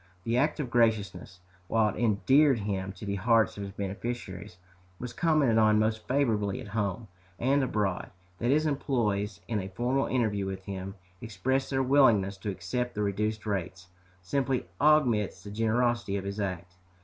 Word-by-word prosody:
This 115 - 0
act 145 +5 +1
of 130 -5 -3
graciousness, 100 -6 0 0.3
while 110 0 +2
it 120 - -3
endeared 130 +6 +4
him 95 -2 -3
to 100 +2 -9
the 100 0 -2
hearts 115 +2 +3
of 100 - -7
his 100 -1 -5
beneficiaries, 100 -2 -5 0.4
was 120 +2 -6
commented 150 -7 +3
on 110 -1 +5
most 110 0 0
favorably 110 -8 +1
at 110 - -8
home 105 +1 -2 0.3
and 135 +3 +2
abroad. 105 -7 -1 0.3
That 120 - 0
his 155 +3 +3
employés, 110 - -1
in 110 -3 -1
a 95 -1 -5
formal 125 +7 0
interview 105 -6 0
with 95 0 -6
him, 95 0 -6 0.3
expressed 120 +5 -1
their 135 -1 +1
willingness 115 -8 +4
to 100 - -5
accept 120 +6 -3
the 105 - -1
reduced 105 +2 -2
rates, 95 -3 -4 0.3
simply 135 +5 -1 0.2
augments 125 -12 +3
the 100 - -8
generosity 115 -1 0
of 95 - -4
his 100 +1 -4
act." 90 -3 -4
110 Hz, 165 wpm, -29 LUFS, 100-125 Hz, 0.4 s, on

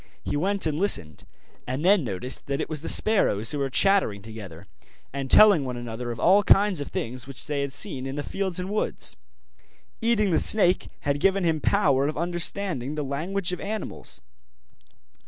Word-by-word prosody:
He - - -3
went 195 +6 0
and 155 -1 -1
listened, 90 - 0 0.4
and 130 +6 -3
then 195 -2 +4
noticed 115 +3 -3
that 140 0 -2
it - - -2
was 155 -3 -4
the - - -4
sparrows 115 - +3
who 145 - -2
were 135 -1 -1
chattering 160 - +2
together, 105 -7 -10 0.5
and 135 -1 -4
telling 205 -6 +6
one 125 -2 -5
another 120 0 -6
of 115 - -5
all 200 +2 +5
kinds 200 -4 +3
of 145 - -5
things 125 +2 -5
which 135 -2 -4
they 145 -2 -2
had 140 -1 -3
seen 135 -1 -1
in 135 - -5
the 145 - -3
fields 190 0 -3
and 185 +2 -4
woods. 210 - -1 0.9
Eating 220 -4 +2
the 160 - +3
snake 190 -4 +3
had 145 -1 -1
given 195 +3 +2
him 160 -3 0
power 140 -9 +2
of 150 - -4
understanding 170 -4 -3
the 150 - -3
language 175 +7 -2
of 180 - -4
animals. 215 +2 -6
150 Hz, 185 wpm, -25 LUFS, 130-195 Hz, 0.9 s, telling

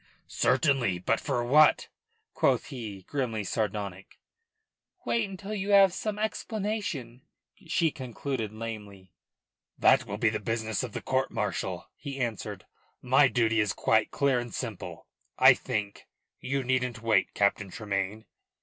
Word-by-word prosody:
"Certainly. 130 - +2
But 110 +5 0
for 125 -4 -1
what?" 150 +5 +5 0.5
quoth - - +1
he, 105 -7 -7
grimly 120 -5 -2
sardonic. 100 -2 -3 0.9
"Wait 225 -4 0
until 195 +2 -7
you 200 -1 -3
have 195 -2 +6
some 210 +1 -3
explanation," 210 - -3 0.5
she 160 0 +2
concluded 130 -3 -4
lamely. 105 -5 -8 0.6
"That 130 -3 +4
will 100 0 -4
be 110 +1 +3
the 110 - -2
business 110 0 -2
of - - -5
the - - -5
court - - 0
martial," - - -3
he 140 -1 -7
answered. 120 -4 -4 0.4
"My 135 +3 +5
duty 115 -3 +2
is 105 -2 +1
quite 110 -1 +2
clear 140 -3 +2
and 120 -1 -6
simple; - - -6 0.3
I - - +8
think. 100 -1 -4 0.3
You 135 +1 -2
needn't 125 -2 -1
wait, 110 -4 +2
Captain 100 0 +1
Tremayne." 100 +1 -3
120 Hz, 135 wpm, -28 LUFS, 105-140 Hz, 0.9 s, I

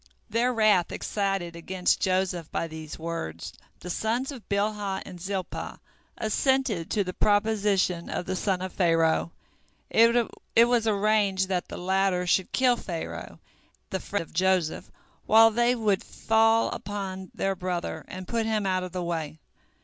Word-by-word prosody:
Their 235 +3 +2
wrath 215 -7 +3
excited 195 -4 -2
against 180 +2 0
Joseph 185 -3 0
by - - -1
these 160 -1 -8
words, 160 - -5 0.3
the 180 - -5
sons 235 - -1
of 255 -6 -11
Bilhah 200 -1 -1
and 180 -2 -10
Zilpah 190 -1 -4 0.4
assented 220 - 0
to 210 - +1
the 185 -1 -5
proposition 205 -4 +1
of 180 - -3
the 185 - -2
son 185 -1 -1
of 185 - -5
Pharaoh. 165 -2 +2 0.6
It 230 0 +3
was 240 -2 +1
arranged 200 -2 +2
that 180 -2 -1
the - - -7
latter 190 0 +1
should 180 +1 +1
kill 250 -2 +3
Pharaoh, 170 -7 -6 0.5
the 190 - -1
friend 200 -1 -3
of - - -19
Joseph, 185 -2 +1 0.4
while 225 +1 +7
they 240 +2 +2
would 210 -5 +1
fall 225 0 +2
upon 190 -2 -5
their 195 0 0
brother, 175 -3 -3
and 185 0 -8
put 230 -1 -1
him 215 -2 0
out 185 -1 +1
of 185 -1 -6
the 180 -1 -2
way. 160 -3 -3
190 Hz, 150 wpm, -27 LUFS, 180-220 Hz, 0.6 s, while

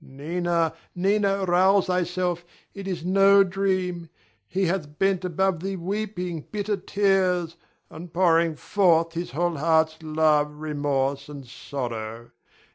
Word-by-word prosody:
Adrian. 135 - -16
Nina! 170 +2 0 0.2
Nina! 195 +1 +1
rouse 190 +2 +4
thyself, 180 -1 -1 0.3
it 195 -1 -8
is 175 -3 -4
no 195 +1 +6
dream; 185 -3 -2 0.4
he 190 - 0
hath 160 -5 -3
bent 195 -1 +1
above 180 0 0
thee 195 +3 -3
weeping 180 -2 -4
bitter 210 0 -1
tears 185 -3 +1 0.3
and 165 +2 -10
pouring 165 -2 +3
forth 165 +1 +2
his 170 +1 -4
whole 170 +1 -1
heart's 160 +1 +2
love, 155 -1 +1
remorse, 145 -2 -2
and 140 -2 -9
sorrow. 120 -3 -6
175 Hz, 125 wpm, -25 LUFS, 155-190 Hz, 0.4 s, no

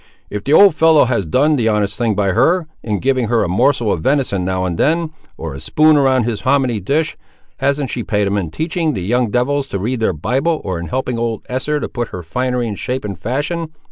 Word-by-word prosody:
"If 105 -1 -4
the 140 - 0
old 200 +2 +7
fellow 160 -2 +5
has 115 -8 -1
done 145 - +2
the 115 -3 +1
honest 105 -2 0
thing 115 -3 0
by 100 -1 +1
her, 170 - +2 0.2
in 105 -3 -2
giving 130 -3 +1
her 115 -1 +2
a - - -1
morsel 120 +4 +2
of 80 - -1
venison 130 - 0
now 95 0 -1
and 90 -2 -2
then, 165 +1 +1 0.3
or 80 -3 -6
a 70 - -8
spoon 155 0 +3
around 135 -3 +3
his 115 -2 -3
homminy 130 -6 +1
dish, 150 - -1 0.4
hasn't 140 -1 0
she 120 - -3
pay'd 105 -1 0
him 100 +1 -1
in 95 -6 -2
teaching 160 - -1
the 90 - -4
young 120 +4 +1
devils 135 +5 0
to 100 - -3
read 115 +6 -2
their 110 - +1
Bible, 135 - -1
or 90 -2 -3
in 85 - -6
helping 125 -2 -2
old 115 -2 -3
Esther 140 +4 -1
to - - -3
put 120 -2 -4
her 90 - -8
finery 125 +7 -1
in 110 - -3
shape 125 +4 -4
and 100 -2 -4
fashion. 145 - -3
125 Hz, 235 wpm, -17 LUFS, 105-145 Hz, 0.4 s, old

